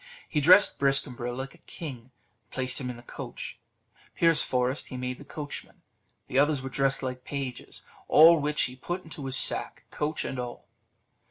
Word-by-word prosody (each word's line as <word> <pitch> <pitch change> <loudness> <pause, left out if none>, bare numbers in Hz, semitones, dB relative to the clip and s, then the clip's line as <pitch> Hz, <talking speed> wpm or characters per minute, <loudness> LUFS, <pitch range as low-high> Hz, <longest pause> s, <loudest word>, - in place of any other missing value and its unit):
He 150 - 0
dressed 185 +7 +6
Briscambril 130 -3 0
like 135 +1 -5
a - - -19
king, 145 -7 -8
and 120 +3 -24 0.4
placed 130 0 -1
him 125 - -3
in 125 - -6
the 120 - -13
coach; - - -8 0.6
Pierceforest 135 -5 +2
he 130 - -7
made 125 0 -4
the - - -10
coachman; 145 0 -7 0.4
the 130 - +1
others 145 -2 +2
were 135 - -4
dressed 135 -1 +1
like 125 -1 -4
pages; 135 -3 -6 0.2
all 165 +2 +8
which 150 +1 +1
he 125 - -3
put 175 +8 -5
into 150 -4 -6
his 130 0 +5
sack, - - +1
coach 150 +1 -2
and 130 - -4
all. 120 -1 -6
135 Hz, 175 wpm, -28 LUFS, 125-150 Hz, 0.6 s, all